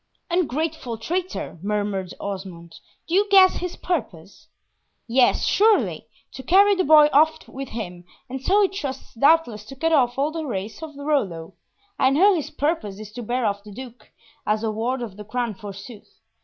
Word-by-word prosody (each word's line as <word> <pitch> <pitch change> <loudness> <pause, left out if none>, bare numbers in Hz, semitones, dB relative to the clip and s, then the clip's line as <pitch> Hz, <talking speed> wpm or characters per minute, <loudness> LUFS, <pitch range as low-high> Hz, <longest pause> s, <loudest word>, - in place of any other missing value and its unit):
"Ungrateful 315 -7 -1
traitor!" 350 - -4
murmured 205 -2 -2
Osmond. 185 -4 -7 0.3
"Do 330 - -5
you 405 +3 +3
guess 380 -2 +6
his 360 -1 -4
purpose?" 210 - -5 0.6
"Yes, 245 +1 +3
surely, 430 +1 +2 0.2
to - - -8
carry 395 +9 +5
the 375 -1 +1
boy 300 0 +7
off 315 +2 +3
with 270 0 -7
him, 180 -6 -7 0.2
and 265 0 -6
so 400 +9 +3
he - - +4
trusts 295 -9 -6
doubtless 260 -4 +3
to 270 - -10
cut 325 +5 0
off 250 -5 +3
all 285 +3 +1
the 325 0 -4
race 215 -2 -5
of 315 -2 -8
Rollo! 200 - -2 0.5
I 260 - +4
know 370 +9 +5
his 320 -6 -2
purpose 250 - -2
is 215 -1 -9
to 240 - -7
bear 240 +2 -1
off 200 -1 -1
the 210 - -12
Duke, 240 0 -11 0.3
as 215 +1 0
a 220 - 0
ward 240 +4 -2
of 210 -4 -8
the 210 - -8
Crown 235 +2 -3
forsooth. 200 +2 -11
250 Hz, 175 wpm, -23 LUFS, 210-320 Hz, 0.6 s, boy